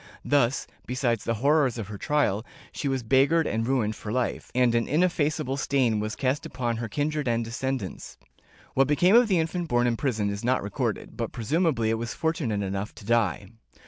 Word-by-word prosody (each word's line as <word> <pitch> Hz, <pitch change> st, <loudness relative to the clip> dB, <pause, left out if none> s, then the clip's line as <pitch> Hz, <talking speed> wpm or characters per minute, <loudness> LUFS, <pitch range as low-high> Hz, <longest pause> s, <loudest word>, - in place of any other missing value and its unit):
Thus, 135 Hz, -3 st, +2 dB, 0.2 s
besides 125 Hz, -3 st, -1 dB
the 115 Hz, -, 0 dB
horrors 145 Hz, -5 st, +3 dB
of 105 Hz, -3 st, -5 dB
her 105 Hz, -, -6 dB
trial, 140 Hz, -9 st, +1 dB, 0.3 s
she 145 Hz, -, -4 dB
was 135 Hz, -2 st, -1 dB
beggared 140 Hz, +7 st, +3 dB
and 115 Hz, +1 st, -1 dB
ruined 115 Hz, -5 st, +1 dB
for 105 Hz, -, -6 dB
life, 125 Hz, +1 st, -2 dB
and 125 Hz, -2 st, +3 dB
an 115 Hz, -1 st, +1 dB
ineffaceable 155 Hz, -4 st, +1 dB
stain 130 Hz, -6 st, +1 dB
was 110 Hz, +1 st, -3 dB
cast 135 Hz, +2 st, 0 dB
upon 120 Hz, -2 st, -3 dB
her 115 Hz, -1 st, -4 dB
kindred 150 Hz, +2 st, -1 dB
and 115 Hz, -1 st, +1 dB
descendants. 125 Hz, -3 st, -4 dB, 0.6 s
What 135 Hz, 0 st, +3 dB
became 175 Hz, +8 st, +4 dB
of 240 Hz, 0 st, +6 dB
the 190 Hz, -4 st, +2 dB
infant 165 Hz, +2 st, -1 dB
born 120 Hz, -4 st, +2 dB
in 120 Hz, -1 st, +1 dB
prison 110 Hz, -7 st, 0 dB
is 100 Hz, +2 st, -5 dB
not 125 Hz, -1 st, +1 dB
recorded, 100 Hz, 0 st, -3 dB
but -, -, -3 dB
presumably 125 Hz, -, +1 dB
it 115 Hz, -, 0 dB
was 115 Hz, 0 st, -4 dB
fortunate 150 Hz, -11 st, -1 dB
enough 100 Hz, +1 st, -4 dB
to 110 Hz, -2 st, -12 dB
die. 105 Hz, -4 st, +1 dB
125 Hz, 190 wpm, -26 LUFS, 110-145 Hz, 0.6 s, of